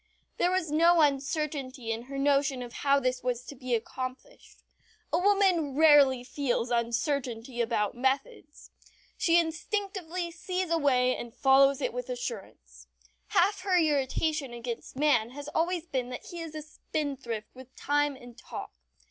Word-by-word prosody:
There 350 - +2
was 365 -4 0
no 335 +2 +5
uncertainty 275 -3 -1
in 225 +1 -4
her 275 +1 -7
notion 275 -2 +2
of 240 -1 -9
how 280 0 +2
this 255 -1 -1
was 250 -1 -2
to - - -8
be 250 -1 -1
accomplished. 255 - -7 0.5
A 335 - +3
woman 370 -7 +2
rarely 285 -5 +6
feels 250 -3 -2
uncertainty 240 0 -1
about 225 -3 0
methods. 265 +3 -3 0.4
She 335 0 +3
instinctively 350 +1 -2
sees 360 +1 -3
a 335 - +3
way 255 -3 +3
and 235 0 -8
follows 275 0 +4
it - - -1
with 250 +1 -5
assurance. 190 - -7 0.4
Half 405 +1 +2
her 375 -2 +2
irritation 295 -2 0
against 235 +1 -6
man 260 -6 +2
has 290 0 -6
always 340 +2 -1
been 260 -6 -3
that 250 - -7
he 345 -2 -7
is 320 -2 -7
a 310 - -5
spendthrift 275 -8 -5
with 260 0 -14
time 290 0 +1
and 245 -2 -13
talk. - - -8
275 Hz, 150 wpm, -29 LUFS, 250-320 Hz, 0.5 s, rarely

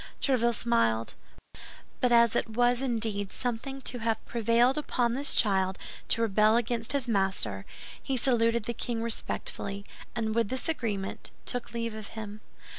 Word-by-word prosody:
Tréville 235 -4 +2
smiled; 115 - +1 0.9
but 250 - +2
as 235 -1 +5
it - - 0
was 245 0 +3
indeed 220 -6 0
something 255 +3 -4
to 245 - -2
have 225 0 -1
prevailed 235 +3 +3
upon 245 -5 0
this 275 +3 +1
child 190 -3 +3 0.3
to 230 - +3
rebel 215 +1 +4
against 235 0 0
his 275 -3 0
master, 190 - 0 0.3
he 270 - -2
saluted 235 -2 +2
the 235 - -3
king 230 0 -3
respectfully, 200 -3 -2 0.3
and 220 -2 -1
with 230 -2 +1
this 260 +4 -2
agreement, 215 -11 -3 0.2
took 245 -1 -3
leave 230 -1 -2
of 215 -1 -7
him. 215 -1 -6
230 Hz, 150 wpm, -29 LUFS, 210-245 Hz, 0.9 s, as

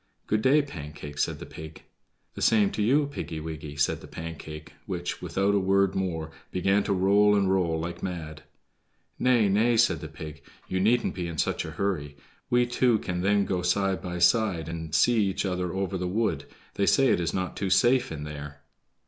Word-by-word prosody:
"Good 110 0 0
day, 140 +5 +4
Pancake," 75 - -8
said - - 0
the - - -8
pig. 80 0 -10 0.5
"The - - -8
same 105 -3 +4
to - - -3
you, 140 +8 +3
Piggy 115 - -5
wiggy," 75 -2 -7
said 70 0 0
the - - -11
Pancake, 80 -2 -8
which, 90 -2 -4
without 95 +4 0
a 100 - +3
word 95 0 +2
more, 80 -4 -3 0.2
began 95 +3 +2
to - - -1
roll 100 +2 +4
and 100 -2 +2
roll 85 -4 +1
like 85 +2 -5
mad. 80 -4 -5 0.8
"Nay, 120 -4 +4
nay," 115 +4 +3
said 110 -9 +3
the 80 - -6
pig, 75 -1 -9 0.3
"you 95 - -1
needn't 115 +5 +2
be 90 -2 -4
in 85 -2 -6
such - - 0
a - - -5
hurry; 75 -8 -2 0.3
we 120 0 +3
two 120 -1 +2
can 90 -3 -3
then 100 +1 +2
go 90 -2 -1
side 95 +2 +1
by 90 -1 -5
side 90 -2 +2
and 80 -2 -4
see 115 +6 +4
each 95 +1 -1
other 90 -2 -2
over 95 0 -2
the 90 - -2
wood; 90 -7 -1 0.3
they 100 - 0
say 135 -2 +4
it - - +3
is 85 -1 -1
not 95 -1 -3
too 95 - -2
safe 125 +6 +3
in 75 -2 -5
there." 75 0 -8
95 Hz, 200 wpm, -27 LUFS, 80-105 Hz, 0.8 s, day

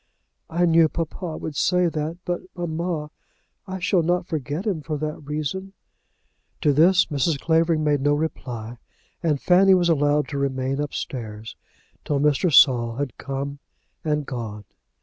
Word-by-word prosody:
"I 175 +2 +2
knew 165 -1 +5
papa 165 0 -4
would 155 - -6
say 180 +4 +2
that; 160 +1 -3
but, 175 0 -2
mamma, 170 -2 -3 0.6
I 190 0 -4
shall 185 -1 +2
not 175 +2 0
forget 155 - -3
him 190 -8 -1
for 155 0 -3
that 150 0 -4
reason." 155 +6 -3 0.9
To 150 -3 +3
this 175 +6 +5
Mrs. 145 0 0
Clavering 165 0 +2
made 145 -2 +2
no 145 +1 +3
reply, 120 -7 -4 0.4
and 155 -4 +1
Fanny 190 +4 +5
was 175 -1 +2
allowed 145 -1 +2
to 140 - -3
remain 135 0 -1
upstairs 115 -6 -5 0.5
till 145 -2 0
Mr. 150 +4 +2
Saul 120 -5 +5
had 140 -2 -3
come 140 +1 -4 0.4
and 150 -2 0
gone. 110 -5 -6
150 Hz, 150 wpm, -23 LUFS, 140-170 Hz, 0.9 s, knew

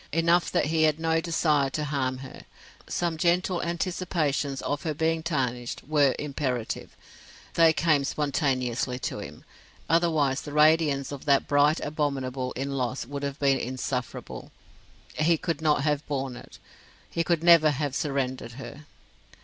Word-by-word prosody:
Enough 170 +1 +2
that - - +2
he 160 +1 +1
had 155 0 +3
no 165 0 +1
desire 155 -4 +1
to 150 +2 -3
harm 135 -3 -1
her. 130 - -12 0.4
Some 170 -2 -1
gentle 175 +2 +1
anticipations 170 -5 -1
of 145 0 -2
her 155 -2 -3
being 160 +1 0
tarnished 125 -7 -2
were 145 -3 +3
imperative; 135 -5 -3 0.6
they 165 -1 +6
came 155 -3 +2
spontaneously 130 -4 -1
to - - -4
him; - - -10 0.4
otherwise 160 -5 +2
the 145 - -8
radiance 150 -2 +3
of 140 -2 -7
that 140 -2 +3
bright 145 +2 +3
Abominable 135 -4 -2
in 135 +2 -3
loss 130 -2 -2
would 140 +2 -6
have 140 0 -3
been 135 -2 +2
insufferable; 125 0 -5 0.7
he 165 +2 +3
could 160 -2 -3
not 150 -3 +2
have 150 -1 0
borne 135 -3 -3
it; - - -12 0.5
he 170 - 0
could 170 -1 0
never 170 -3 +7
have 145 -1 -2
surrendered 130 -5 -2
her. 140 +3 -10
145 Hz, 150 wpm, -27 LUFS, 135-160 Hz, 0.7 s, never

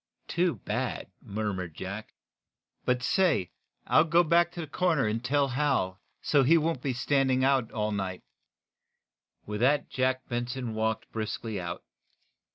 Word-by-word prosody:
"Too 175 -1 +1
bad," - - -3
murmured 100 -5 -4
Jack. 100 - -7 0.7
"But 125 0 +1
say, 180 - +2 0.3
I'll 155 - +5
go 170 +2 +4
back 170 +1 +3
to 175 - -5
the - - -4
corner, 160 -2 +1
and 110 +2 -1
tell 140 +2 +2
Hal, 125 -9 0 0.2
so 145 - +4
he 155 +6 +5
won't 160 -4 0
be 135 - -1
standing 130 +1 +2
on 135 -4 +3
the - - -21
corner 110 - -4
all 105 - 0
night." 95 -3 -3 1.2
With 105 0 -4
that 140 +4 +2
Jack 130 0 0
Benson 120 0 -3
walked 110 0 -2
briskly 110 -2 -3
out. 85 -1 -5
130 Hz, 155 wpm, -29 LUFS, 110-150 Hz, 1.2 s, I'll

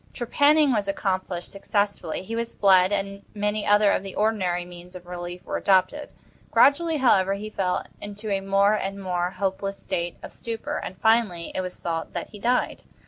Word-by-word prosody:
Trepanning 285 +3 +3
was 205 -3 0
accomplished 185 -3 -2
successfully. 200 -3 -2
He 225 +4 -5
was 230 0 -3
bled, 190 -1 +5
and 200 0 -2
many 210 0 -1
other 205 0 +5
of - - +1
the 195 -1 -8
ordinary 185 -5 0
means 175 +1 -12
of 180 -1 -10
relief 175 0 -7
were - - -2
adopted. 195 +10 +2 0.4
Gradually, 320 +3 +4
however, 195 -8 +3
he 215 +2 -7
fell 185 -3 -1 0.2
into 205 +1 -6
a 195 -1 0
more 195 +1 +3
and 195 -1 -2
more 180 -2 -1
hopeless 195 +1 -3
state 170 0 -3
of - - -9
stupor, 230 -1 -4
and, 185 - -6
finally, 220 -7 +2
it - - -1
was 185 -1 -6
thought 165 -1 -3
that - - -4
he 210 - -10
died. 245 +4 0
195 Hz, 180 wpm, -25 LUFS, 185-215 Hz, 0.4 s, bled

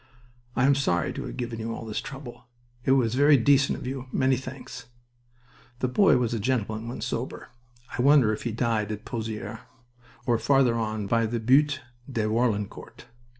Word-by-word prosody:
"I 125 - +3
am 140 - +5
sorry 90 - 0
to - - -5
have - - -7
given 120 -2 -4
you 115 +1 -3
all - - -7
this 110 -1 -3
trouble. 130 -2 -9 0.4
It 130 - +4
was 120 -4 +2
very 145 +2 +6
decent 140 +3 +3
of - - -8
you. 130 0 -5
Many 130 0 +2
thanks." 130 -1 -8 0.9
The 130 - 0
boy 160 +4 +4
was 120 -2 0
a 115 - -1
gentleman 110 -1 -1
when 120 - -6
sober. - - -4 0.5
I - - -1
wonder 135 -5 +5
if 105 - -5
he 120 - -2
died 110 -2 0
at 105 0 -6
Pozieres, 110 -3 -5 0.7
or 120 -3 +2
farther 130 +1 +3
on 110 -2 -2
by 115 +2 +1
the 115 +1 -2
Butte 140 +5 +3 0.3
de 115 -4 -1
Warlencourt... 110 -2 -2
120 Hz, 180 wpm, -26 LUFS, 110-130 Hz, 0.9 s, very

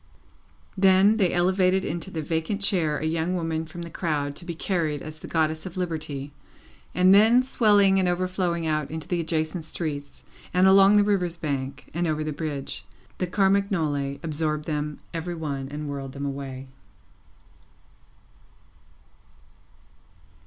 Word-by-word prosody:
Then, 195 +2 +5
they 190 -5 +2
elevated 185 +1 +2
into 165 +4 -3
the 160 -4 -4
vacant 160 +6 -2
chair 165 -7 +1
a 155 - -3
young 165 +3 0
woman 165 -2 -2
from 170 +2 -8
the 170 - -8
crowd 145 -4 -2
to 170 - -10
be 170 -1 -5
carried 160 -5 -1
as 155 0 -8
the - - -9
Goddess 160 +1 0
of 185 - -9
Liberty, 155 -5 -4 0.6
and 185 +1 +6
then 225 +5 +6
swelling 205 -6 +4
and 185 - +2
overflowing 175 -1 -1
out 155 -2 -1
into 160 0 -6
the 175 - -1
adjacent 160 +1 -1
streets, 145 -3 -5 0.3
and 180 +1 +5
along 195 +2 +7
the 205 - +6
river's 180 -4 0
bank, 140 -4 -4
and 170 +2 0
over 155 -1 -1
the 155 0 -3
bridge, 140 - -4 0.4
the 180 - 0
Carmagnole 180 -8 +1
absorbed 155 -1 -2
them 150 -1 -3 0.2
every 170 +1 -3
one 140 -4 -4
and 150 +1 -5
whirled 135 -2 -5
them 140 +1 -5
away. 135 -1 -5
165 Hz, 145 wpm, -25 LUFS, 150-185 Hz, 0.6 s, along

